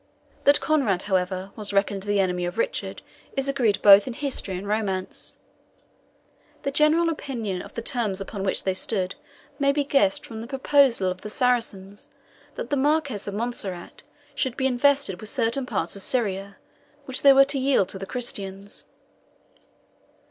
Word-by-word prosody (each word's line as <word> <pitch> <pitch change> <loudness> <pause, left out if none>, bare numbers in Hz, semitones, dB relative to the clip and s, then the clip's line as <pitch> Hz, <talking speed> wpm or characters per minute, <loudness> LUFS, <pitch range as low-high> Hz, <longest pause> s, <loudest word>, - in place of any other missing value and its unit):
That 285 +1 +6
Conrade, 260 - +1
however, 185 0 -1
was 210 -2 -2
reckoned 200 0 +1
the 205 +1 0
enemy 180 -2 0
of 175 - -5
Richard - - -2 0.3
is 270 0 0
agreed 245 -7 +1
both 200 +1 +8
in 250 - -3
history 240 -8 -3
and 195 +2 -7
romance. 200 -3 -3 1.3
The 275 - -1
general 305 +4 +4
opinion 230 - -3
of - - -12
the 230 - -4
terms 225 -7 -1
upon 195 +1 -6
which 190 - +1
they 190 - 0
stood 185 -1 -2 0.5
may 280 0 +3
be 290 +1 0
guessed 275 -9 +2
from 220 -1 -8
the 230 - -7
proposal 270 -7 +3
of 185 - -7
the 210 - -7
Saracens 210 -5 -1 0.5
that - - -6
the 285 - +2
Marquis 285 -7 0
of 200 - -6
Montserrat 205 -6 -3 0.3
should 260 -4 -2
be 265 - 0
invested 265 -5 +2
with 215 - -4
certain 250 +2 0
parts 190 -7 -2
of 200 - -5
Syria, 200 -4 -1 0.5
which 260 -1 -2
they 280 - +8
were 275 0 +7
to 280 0 -1
yield 265 -8 +2
to 190 - -4
the 195 - -6
Christians. 200 -5 -3
220 Hz, 165 wpm, -25 LUFS, 195-275 Hz, 1.3 s, both